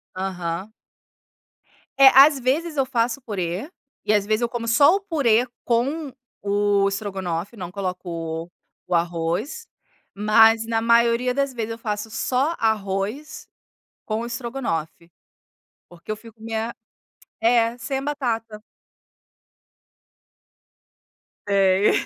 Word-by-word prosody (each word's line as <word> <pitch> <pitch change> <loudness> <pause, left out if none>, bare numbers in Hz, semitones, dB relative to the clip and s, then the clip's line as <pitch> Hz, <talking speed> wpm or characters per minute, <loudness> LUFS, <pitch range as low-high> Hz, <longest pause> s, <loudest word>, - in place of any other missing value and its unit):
Aham. 185 +1 -4 1.3
É 275 0 +9
às 275 +1 +8
vezes 300 +5 -1
eu 270 - +2
faço 245 0 -1
purê, 195 - -4 0.4
e 210 - +2
às 205 -1 +2
vezes 215 +2 0
eu 235 - 0
como 235 -1 -4
só 285 +10 +5
o 400 - -2
purê 255 - +2 0.2
com 275 +6 0 0.3
o 200 0 +2
estrogonofe, 195 -1 -3
não 180 -2 -6
coloco 175 -4 -5 0.4
o 180 - 0
arroz, 175 - -2 0.5
mas 220 +2 +5
na 225 0 0
maioria 235 +2 +3
das 275 0 -1
vezes 230 -1 -4
eu 225 - -5
faço 215 -1 -4
só 270 +8 0
arroz 215 +5 -2 0.6
com 215 0 -2
o 235 - -4
estrogonofe, 230 - -4 0.8
porque 175 +3 -13
eu 215 - -1
fico 220 0 -16
meia 225 +1 -3 0.7
é, 230 0 +3
sem 270 +3 -3
a 270 - -3
batata. 230 -7 -3 2.9
Sei, 195 0 +4
225 Hz, 115 wpm, -23 LUFS, 195-250 Hz, 2.9 s, É